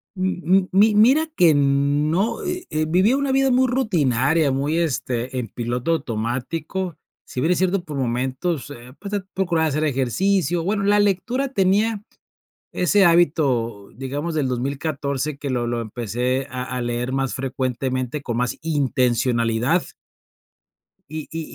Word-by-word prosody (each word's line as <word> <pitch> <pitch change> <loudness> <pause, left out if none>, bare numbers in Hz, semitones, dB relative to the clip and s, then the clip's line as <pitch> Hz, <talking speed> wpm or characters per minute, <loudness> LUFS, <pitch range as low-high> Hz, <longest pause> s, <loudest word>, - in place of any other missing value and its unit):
M 185 -1 -2
m 185 +2 +3
mi 210 +3 +5
mira 255 +9 +5
que 160 -4 +5
no, 145 - +1
eh 360 -1 -4
eh, 155 0 0
vivía 190 +10 +3
una 280 -1 0
vida 270 0 +3
muy 255 +1 +3
rutinaria, 160 - +2
muy, 140 +4 0
este, 130 -6 -1
en 115 - -4
piloto 120 +7 -2
automático, 150 - -3 0.3
si - - -6
bien 165 - +2
es - - -2
cierto, 185 0 +1
por 150 -4 -6
momentos, 130 +5 -2
eh, 125 -2 -11
pues 200 -1 -7
de 205 - -1
procurar 175 -4 +1
hacer 150 +1 -1
ejercicio, 165 - +1
bueno, 200 +3 0
la 205 +1 +4
lectura, 240 +7 0
tenía 205 0 +1 0.7
ese 195 +2 +3
hábito, 140 - +2
digamos, 145 +6 -4
del 145 -4 0
2014 140 +2 -2
que 140 -1 -4
lo 120 -2 -1
lo 120 -1 -1
empecé 120 +4 -2
a 125 0 -4
a 125 0 -4
leer 120 +1 -2
más 135 -1 -1
frecuentemente 130 0 -2
con 120 -3 -3
más 125 0 -1
intencionalidad. 125 -1 +1 1.3
Y 155 -1 -6
y 165 0 -4
145 Hz, 150 wpm, -22 LUFS, 125-185 Hz, 1.3 s, mi